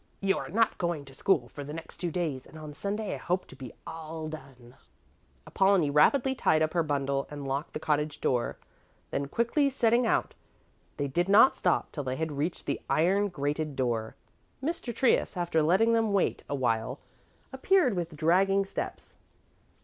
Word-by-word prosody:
You 195 -1 +2
are - - -6
not 225 +5 +1
going 170 -5 -2
to 135 - -13
school 135 -4 +1
for 145 - -8
the 150 +2 -7
next 165 - -9
two 175 0 -2
days 155 -6 -3
and 160 - -13
on 155 -1 -8
Sunday 205 +5 -3
I - - -4
hope 185 +1 -1
to - - -14
be 130 -3 -9
all 160 -1 -6
done." 135 -5 -11 0.7
Apollonie 190 -6 +3
rapidly 265 - +4
tied 155 -11 +2
up 155 - -1
her 170 - +2
bundle 140 -2 -1
and 145 -2 -6
locked 140 +3 -3
the - - -3
cottage 150 -1 -1
door. 125 -5 0 0.5
Then 140 - -2
quickly 235 - +1
setting 240 -2 +2
out, - - +1 0.6
they 145 - -1
did 175 +7 0
not 215 +6 +7
stop 180 - 0
till 145 - -4
they 130 -1 -2
had 160 +2 -2
reached 150 +5 -3
the - - -2
iron 195 +6 +3
grated 150 -3 -3
door. 120 -4 -1 0.5
Mr. 310 -5 -2
Trius, 235 -4 +1
after 170 -2 +1
letting 190 +9 +3
them 225 -2 +2
wait 195 - +1
a 145 - -1
while, 120 0 -1 0.5
appeared 375 - +3
with 170 -3 -3
dragging 195 +5 +3
steps. 195 - -6
160 Hz, 180 wpm, -29 LUFS, 140-195 Hz, 0.7 s, not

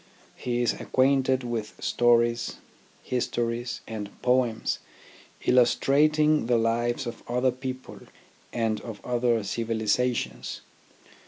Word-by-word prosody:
He 120 -1 -1
is 120 - +2
acquainted 130 -1 +2
with 115 -3 -4
stories, 120 +2 +2 0.5
histories, 120 -1 -2
and 105 -2 -5
poems 125 -3 +1 0.7
illustrating 150 +4 +4
the 120 -1 +3
lives 120 +2 0
of 120 -1 -6
other 125 +1 +2
people 130 0 -7 0.5
and 110 -3 -1
of 110 -3 -8
other 120 -2 +1
civilizations. 110 - -1
120 Hz, 95 wpm, -27 LUFS, 115-125 Hz, 0.7 s, illustrating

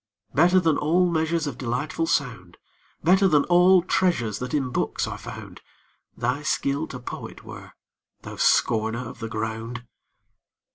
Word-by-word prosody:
Better 175 +5 +5
than 160 -4 +1
all 175 +4 +2
measures 160 -1 0
Of 145 - -5
delightful 140 +6 -2
sound, 115 - -2 0.5
Better 190 +4 +5
than 150 -5 +4
all 180 +1 +5
treasures 120 - 0
That 125 0 -5
in 135 -4 -1
books - - -1
are - - -6
found, - - -10 0.6
Thy 125 +5 -1
skill 145 +1 -1
to 130 - -7
poet 125 - -8
were, - - -11 0.5
thou - - -8
scorner 115 +1 +1
of - - -10
the 115 -1 -5
ground! 110 +3 -5
140 Hz, 145 wpm, -24 LUFS, 120-170 Hz, 0.6 s, Better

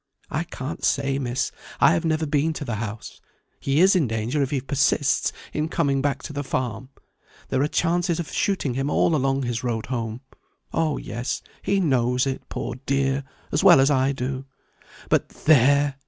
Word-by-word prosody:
"I 160 +3 -1
can't 140 -2 -6
say, 140 -1 +1
Miss; 130 0 -1 0.3
I - - +6
have 165 - 0
never 160 0 +1
been 150 +2 +1
to 150 - -5
the 115 -5 -3
house. 110 -1 -6 0.4
He 140 +4 +1
is 190 +1 +6
in 165 -8 +3
danger 115 +6 -1
if 135 - 0
he 140 -2 0
persists 135 +1 +1 0.2
in 155 +1 -1
coming 140 -5 +1
back 140 -1 -1
to - - -7
the 145 0 -3
farm. 125 -2 -3 0.6
There 130 - +1
are 145 - +2
chances 170 +2 +1
of 170 - -4
shooting 185 -10 0
him 135 +3 -1
all 160 - +3
along 135 -1 +1
his 120 -1 -2
road 115 -3 -2
home. 115 -2 -4 0.5
Oh, 160 -3 +1
yes; 120 +3 -4 0.2
he 200 0 +1
knows 125 -6 +2
it, 135 -1 -2
poor 120 - -4
dear, 135 0 +1 0.3
as - - +1
well - - +8
as 135 +2 +4
I 135 0 +3
do. 130 0 -4 0.6
But, - - +1
there! 140 -1 +3
135 Hz, 185 wpm, -24 LUFS, 125-150 Hz, 0.6 s, well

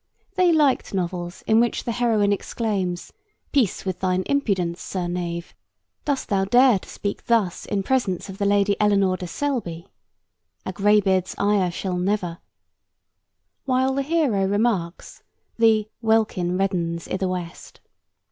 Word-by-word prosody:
They 365 -2 +3
liked 290 -9 +2
novels 175 -1 -3
in 220 +1 +4
which 235 0 +1
the 235 - -2
heroine 225 -4 +2
exclaims, 195 -4 -3 0.4
'Peace 250 -11 +1
with 185 -1 -3
thine 185 0 0
impudence, 190 -11 0
sir 185 -2 -3
knave. 175 -1 -4 0.5
Dost 285 -2 -1
thou 195 -3 +1
dare 245 +1 +5
to - - -15
speak 200 - -5
thus 215 -7 +1
in 200 -1 -1
presence 210 -7 0
of 195 -1 -9
the 200 - 0
Lady 200 0 +3
Eleanore 200 -3 +3
de 180 - -6
Selby?... 185 -8 -3 0.8
A 185 - -4
greybeard's 195 -2 +2
ire 200 -2 +2
shall 180 +1 -3
never 180 -3 -1 0.6
,' - - -54
while 260 0 +2
the 275 - 0
hero 280 -9 +1
remarks 200 -4 -1
that - - -40 0.4
'the 220 -2 +4
welkin 215 -6 +1
reddenes 170 -4 -1
i' - - -2
the 190 - -1
west.' 180 -2 -6
200 Hz, 145 wpm, -23 LUFS, 180-230 Hz, 0.8 s, dare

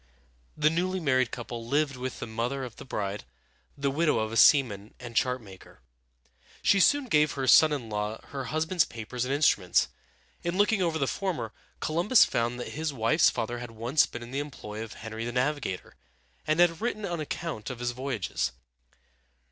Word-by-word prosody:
The 150 0 +3
newly 185 +3 0
married 130 -6 +2
couple 120 -1 -6
lived 140 +3 0
with 130 0 -5
the - - -4
mother 120 +4 -3
of 125 -3 -8
the - - -10
bride, 100 -4 -3 0.5
the 140 -1 0
widow 150 -1 +2
of 110 0 -1
a - - -4
seaman 110 -5 +4
and 120 -2 -9
chart 125 0 +1
maker. 95 -3 -14 0.8
She 200 - +4
soon 285 +8 +4
gave 150 - +3
her 135 -1 -2
son 155 +4 +7
in 135 -6 -3
law 105 +1 -3
her 135 -2 -5
husband's 160 +4 +1
papers 120 +2 -5
and 130 - -3
instruments. 140 - +3 0.5
In 170 +1 -2
looking 205 0 +3
over 165 -3 +1
the 140 - +1
former, 160 - -3 0.3
Columbus 175 +10 +4
found 120 +1 -1
that - - -5
his 155 0 -3
wife's 135 +5 +3
father 120 0 -3
had 120 -1 -7
once 120 +7 +2
been 120 - -7
in 120 - -10
the 135 - -2
employ 110 -7 -6
of 115 - -9
Henry 110 0 -6
the 120 - -3
Navigator, 130 -5 -2 0.5
and 155 +2 +2
had 175 0 +4
written 215 -3 -2
an 175 -3 -3
account 155 -6 -4
of 130 - -5
his 120 0 -2
voyages. 115 - -2
130 Hz, 185 wpm, -28 LUFS, 115-155 Hz, 0.8 s, son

